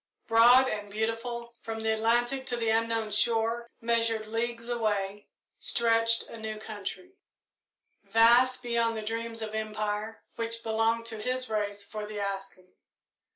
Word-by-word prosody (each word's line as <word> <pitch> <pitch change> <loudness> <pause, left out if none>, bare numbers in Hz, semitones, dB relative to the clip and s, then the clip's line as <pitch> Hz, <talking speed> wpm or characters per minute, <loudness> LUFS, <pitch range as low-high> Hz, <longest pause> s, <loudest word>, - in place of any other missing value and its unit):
Broad 240 +3 +7
and 205 -4 -3
beautiful, 230 +3 -3
from 225 0 -5
the 220 0 +1
Atlantic 240 +4 +1
to 245 - -1
the 230 -1 0
unknown 225 -1 0
shore 230 +2 +1
unmeasured 230 -1 +1
leagues 230 +1 -2
away, 205 -4 -1 0.3
stretched 230 0 +2
a - - -10
new 220 -1 -4
country, 220 - -7 0.9
vast 240 +5 +5
beyond 235 -1 +1
the 215 - -4
dreams 225 +1 -3
of 215 -1 -5
empire, 215 0 -3
which 230 0 -3
belonged 225 +1 +1
to 220 -2 -4
his 255 0 -1
race 205 -1 -2
for 210 0 -6
the 210 -1 -6
asking. 195 -2 -5
225 Hz, 140 wpm, -29 LUFS, 215-235 Hz, 0.9 s, Broad